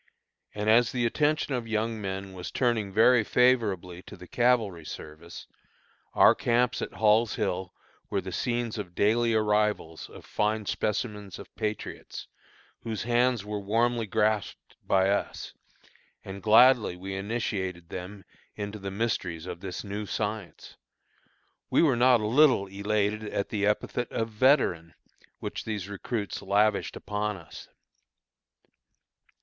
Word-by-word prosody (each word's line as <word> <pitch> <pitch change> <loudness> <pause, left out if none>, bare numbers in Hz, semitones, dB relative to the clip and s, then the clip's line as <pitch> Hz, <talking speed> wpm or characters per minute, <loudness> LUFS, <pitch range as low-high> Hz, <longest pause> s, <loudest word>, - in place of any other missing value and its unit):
And 105 0 -3
as 115 +2 +5
the 120 -2 0
attention 145 +3 +1
of 120 -3 -3
young 110 0 -1
men 95 0 -5
was 90 -1 -6
turning 115 -6 0
very 115 +3 +5
favorably 105 -8 +1
to - - -10
the 90 - -11
cavalry 115 -8 +1
service, 80 +2 -9 0.7
our - - +7
camps 120 +1 +1
at - - -5
Hall's 110 +1 +3
Hill 95 -5 -3 0.3
were - - 0
the - - -6
scenes 120 -2 -2
of 90 -4 -7
daily 115 +2 +2
arrivals 105 -6 0
of - - -13
fine 105 0 -1
specimens 105 -1 -3
of - - -13
patriots, 110 -1 -5 0.5
whose 110 -3 -4
hands 120 -2 +1
were 105 0 -3
warmly 115 +3 0
grasped 105 0 -1
by 95 0 +2
us; 100 +1 -2 0.7
and 95 +1 -7
gladly 110 0 +5
we 95 +2 -7
initiated 95 -4 -3
them 95 +2 -8 0.3
into 105 +1 -5
the 100 0 -5
mysteries 95 -6 -2
of 90 -2 -6
this 95 -1 -6
new 105 +1 -5
science. 105 -2 -5 0.9
We - - +4
were 145 -6 +4
not 125 -1 +5
a - - -2
little 130 -2 +4
elated 105 +2 -1
at 100 -1 -3
the 105 -2 0
epithet 115 +3 -1
of 115 0 -2
"Veteran," 105 - +2 0.4
which - - -5
these 105 -4 -4
recruits 105 +1 -4
lavished 100 +1 +1
upon 105 0 -3
us. 85 -3 -12
105 Hz, 135 wpm, -27 LUFS, 95-115 Hz, 0.9 s, our